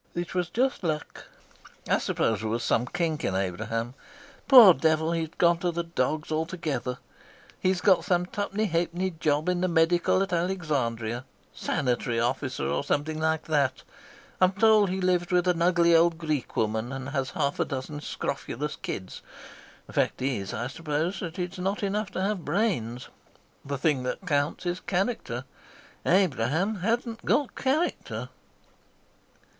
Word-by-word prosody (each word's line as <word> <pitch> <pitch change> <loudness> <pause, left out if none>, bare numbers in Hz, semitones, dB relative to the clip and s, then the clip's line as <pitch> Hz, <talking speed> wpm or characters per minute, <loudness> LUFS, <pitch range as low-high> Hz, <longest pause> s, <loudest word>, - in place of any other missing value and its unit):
"It 175 0 -3
was 180 -2 -1
just 255 +2 0
luck. 155 -3 -3 0.6
I - - +3
suppose 110 -3 0
there 110 - -2
was 115 +2 -1
some 120 +2 +1
kink 165 -2 -2
in 95 - 0
Abraham. 110 +6 -2 0.5
Poor 245 -9 +10
devil, 160 +3 +1
he's 165 -2 -1
gone 170 -1 +4
to 175 0 0
the 170 0 -2
dogs 155 -2 -2
altogether. 155 -6 -2 0.6
He's 185 -1 +1
got 185 -4 +4
some 180 0 +1
twopenny 205 +3 -2
halfpenny 175 +1 -1
job 150 +1 +1
in 180 -1 +1
the 185 - +2
medical 175 +2 +3
at 195 - -4
Alexandria 135 -10 -1 0.3
sanitary 120 -3 -1
officer 125 - -1
or 70 +1 -1
something 155 +2 -1
like 160 0 0
that. 140 -5 0 0.6
I'm 185 +1 +5
told 215 -1 +5
he 190 +1 -2
lives 180 -1 +1
with 180 0 +2
an 175 -2 +1
ugly 170 -1 +4
old 165 0 +4
Greek 155 -5 -3
woman 110 +2 0
and 135 0 -5
has 135 -2 -1
half 145 -2 -1
a - - +2
dozen 140 +2 -5
scrofulous 150 0 -4
kids. 95 -1 -6 0.6
The - - -14
fact - - +1
is, 125 -7 -2
I 115 - -3
suppose, 155 +6 -2
that 170 0 -6
it's 180 +1 -4
not 195 +3 -2
enough 200 +1 -1
to 185 - -1
have 195 -3 -1
brains. 125 - -1 0.5
The 140 0 -3
thing 140 -1 +1
that 125 +9 -4
counts 145 +1 0
is 175 +1 -1
character. 180 - -2 0.6
Abraham 180 - +2
hadn't 230 +4 -1
got 285 -3 +1
character." 300 +6 -1
165 Hz, 155 wpm, -27 LUFS, 135-185 Hz, 0.6 s, Poor